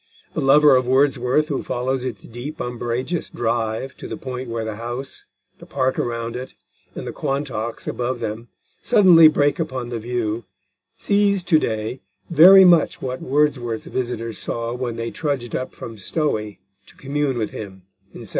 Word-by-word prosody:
The - - -2
lover 145 +1 +6
of 130 -1 +1
Wordsworth 135 +2 +2
who 140 - -1
follows 130 +1 -2
its 120 -6 -5
deep 120 +6 -8
umbrageous 120 +7 -3
drive 115 +2 -2
to - - -8
the - - -6
point 130 -1 -6
where 115 -1 -3
the 110 -1 -5
house, 120 +4 -6 0.3
the - - -13
park 130 -1 -1
around 115 -1 -3
it, 125 +1 -7 0.4
and - - -6
the - - -4
Quantocks 135 -5 -3
above 125 0 -2
them 115 +1 -5 0.3
suddenly 175 -5 +7
break 145 0 +2
upon 130 -6 -3
the 120 -1 -4
view, 115 -1 -3 0.5
sees 200 -2 +2
to 160 -3 +4
day 110 +2 -3 0.3
very 185 +4 +9
much 170 -3 +4
what 130 0 -4
Wordsworth's 130 -5 0
visitors 115 -3 -4
saw 115 0 -3
when 125 -2 -3
they 115 0 -4
trudged 140 -7 -3
up 130 - -4
from 115 -2 -9
Stowey 105 - -2 0.3
to - - -17
commune 140 -1 -2
with 110 -2 -2
him 95 -3 -9 0.3
in - - -12
1797. - - -10
125 Hz, 165 wpm, -21 LUFS, 115-145 Hz, 0.5 s, very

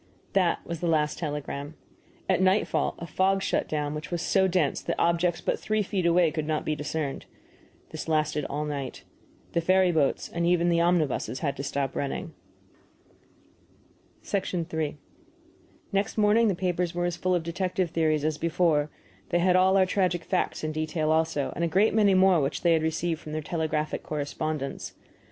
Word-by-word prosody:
That 185 -3 +1
was 170 -1 -5
the 175 - -2
last 155 -2 +1
telegram. 145 -1 -4 0.5
At 185 -1 +2
nightfall 190 +3 +2
a 170 - -6
fog 190 +4 +1
shut - - 0
down 150 -1 -1
which 150 0 -6
was 175 -2 -2
so 190 -1 +3
dense 175 -6 +1
that 170 - -2
objects 170 0 +1
but - - -1
three 215 0 0
feet 190 -3 -1
away 170 -1 +4
could 155 -2 -3
not 155 -1 -1
be 155 - 0
discerned. 150 -1 -4 0.6
This - - -6
lasted 155 -1 +1
all 150 +2 -3
night. 140 -3 -5 0.5
The 170 - +1
ferry 185 +1 +4
boats 155 -5 +1
and 170 - -3
even 175 0 +3
the 170 -1 +3
omnibuses 165 -6 +1
had 140 -3 -1
to 140 - -4
stop 140 -1 -2
running. 140 - -3 1.9
III 165 -6 -2 1.0
Next 200 +2 0
morning 215 +2 +4
the 200 - +1
papers 180 -1 -1
were 175 0 0
as 175 -1 -1
full 185 0 0
of 175 - -1
detective 180 +1 -2
theories 155 -3 +1
as 155 -1 -1
before; 165 -3 +1 0.4
they 175 - +2
had 180 +1 +3
all 190 +1 +5
our 190 - +5
tragic 180 -3 0
facts 185 -4 -1
in 155 - -1
detail 155 0 -1
also, 160 -4 0
and 170 - -2
a - - +2
great 195 +7 +3
many 205 -3 +4
more 185 -3 +5
which 140 +1 -2
they 170 -1 +5
had 160 - +2
received 160 +1 -1
from 155 - -8
their 155 - -2
telegraphic 155 -2 -2
correspondents. 150 -1 -4
170 Hz, 180 wpm, -27 LUFS, 155-180 Hz, 1.9 s, all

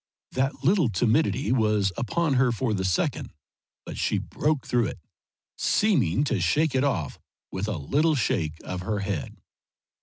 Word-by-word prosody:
That 135 +1 -1
little 170 - +3
timidity 125 - +1
was 105 -5 +2
upon 145 +6 0
her 130 -1 +3
for 115 0 -1
the 95 -2 -1
second, 95 -2 -1 0.5
but - - -7
she - - +1
broke 150 -3 -1
through 120 -3 +1
it, - - -6 0.6
seeming 145 - +2
to 145 - 0
shake 155 -1 +2
it 130 0 +2
off 85 - -1 0.3
with 95 +3 -3
a 105 -5 -2
little 150 - +1
shake 80 - -1
of 90 -1 -5
her 105 +2 -2
head. 100 -6 -4
120 Hz, 155 wpm, -26 LUFS, 100-145 Hz, 0.6 s, little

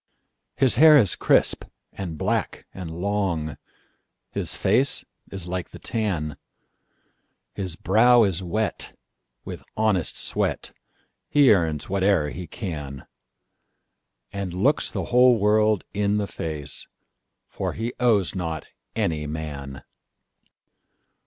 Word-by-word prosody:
His 130 -3 +3
hair 155 +2 +9
is 105 -9 +4
crisp, - - +3 0.3
and 85 -5 -5
black, - - -1
and 90 -3 -7
long, 85 -3 -2 0.7
His - - -2
face - - +2 0.3
is 95 -3 -4
like 90 0 -4
the - - -11
tan; 90 -10 -2 1.2
His 95 -4 -4
brow 115 +7 +5
is 95 -3 0
wet 100 +4 -3 0.5
with - - -7 0.2
honest 105 -6 +1
sweat, - - -2 0.6
He 140 -5 +6
earns 80 -6 0
whate'er 95 -6 +1
he 90 -1 -7
can, 75 - -6 1.3
And 95 -3 -4
looks 135 +11 +2
the - - -3
whole 125 -1 +6
world 105 0 +3
in 105 0 +1
the 105 - 0
face, 75 -6 -5 0.6
For - - -4
he 115 +2 -3
owes 110 -7 +3
not 80 -5 -4 0.3
any 75 -2 -1
man. 70 -4 -6
95 Hz, 115 wpm, -24 LUFS, 80-110 Hz, 1.3 s, hair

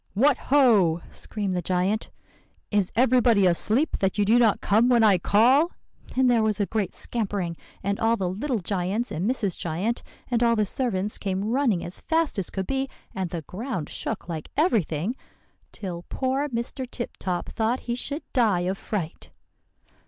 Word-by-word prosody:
"'What 270 +6 +4
ho!' 215 - +5
screamed 205 -3 -3
the 180 - -1
giant, 185 +5 0 0.6
'is 205 -3 +1
everybody 240 -4 +4
asleep 215 - +1
that 195 0 0
you 205 - +3
do 230 +4 +5
not 225 -4 +4
come 225 +5 +3
when 240 -2 +5
I 200 -4 +5
call?' 255 - +4 0.4
And 260 0 +4
there 240 -2 +4
was 215 -1 +1
a 205 - +2
great 210 -1 -2
scampering; 200 -7 -2 0.3
and 200 +1 -1
all 225 +1 +2
the 190 - -1
little 235 +8 -1
giants 200 +5 -2
and 180 +8 -1
Mrs. 210 -8 0
Giant, 180 +8 -2 0.3
and 235 -1 +2
all 235 -1 +4
the 215 -1 +2
servants 210 -3 -1
came 195 +2 -2
running 245 -9 +1
as 175 - -5
fast 325 -8 0
as 185 - -1
could 190 -1 -3
be. 270 +3 -1 0.2
And 190 -2 -3
the 165 -2 -5
ground 190 - -5
shook 220 - -4
like 160 -3 -5
everything, 215 - +1 0.6
till 180 -5 -6
poor 270 +2 -1
Mr. 240 +1 -3
Tip 240 -2 -6
Top 180 -2 -2
thought 230 +3 -1
he 240 - -3
should 285 +5 -3
die 220 -9 +3
of 185 +2 -2
fright. 180 -7 -4
215 Hz, 175 wpm, -25 LUFS, 185-245 Hz, 0.6 s, ho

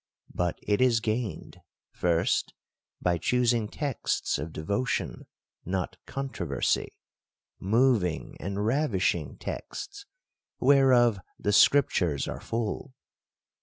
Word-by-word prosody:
But 90 -1 -1
it 105 +2 +1
is 125 -3 +4
gained, 110 -1 -3 0.2
— - - -67
First, 85 -1 0 0.5
by 85 -1 +2
choosing 120 +2 +2
textsof 110 - -2
devotion, 100 +11 -2 0.4
not 95 +1 -3
contro 135 0 -4
versy; - - 0 0.7
moving 105 -5 +1
and 100 +3 -3
ravishing 115 -6 0
texts, 405 0 -7 0.5
whereof 125 -6 +5 0.2
the 105 - -1
scrip 140 +6 +6
tures 75 -6 0
are - - -5
full. 115 +3 -3
110 Hz, 100 wpm, -28 LUFS, 95-130 Hz, 0.7 s, scrip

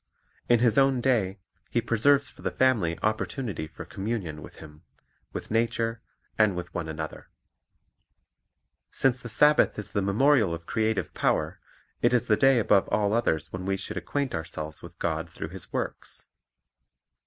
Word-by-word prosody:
In 120 -1 +5
His 120 0 +4
own 135 -2 +4
day 110 -7 +1 0.3
He 120 - +1
preserves 135 +5 +3
for - - -12
the - - -1
family 110 -11 +2
opportunity 110 - -2
for 80 - -10
communion 95 -7 -4
with - - -11
Him, 75 -1 -13 0.5
with - - -6
nature, 115 0 0 0.4
and 105 -4 +4
with 90 -1 -6
one 85 -2 -3
another. 80 0 -6 1.6
Since 130 -1 +1
the 120 - -8
Sabbath 150 +7 +4
is 105 -3 -6
the 100 - 0
memorial 105 - +3
of 85 0 -11
creative 110 0 -1
power, - - 0 0.4
it - - +4
is 125 - +2
the 110 - +4
day 135 +3 +5
above 105 -3 +3
all 105 -1 +1
others 80 -9 0
when 95 0 -4
we 95 +1 0
should 95 - -6
acquaint 140 -2 -2
ourselves 80 -2 -5
with 85 0 -12
God 80 0 -2
through 80 -1 -6
His 95 +1 -7
works. - - -4
105 Hz, 160 wpm, -27 LUFS, 85-120 Hz, 1.6 s, In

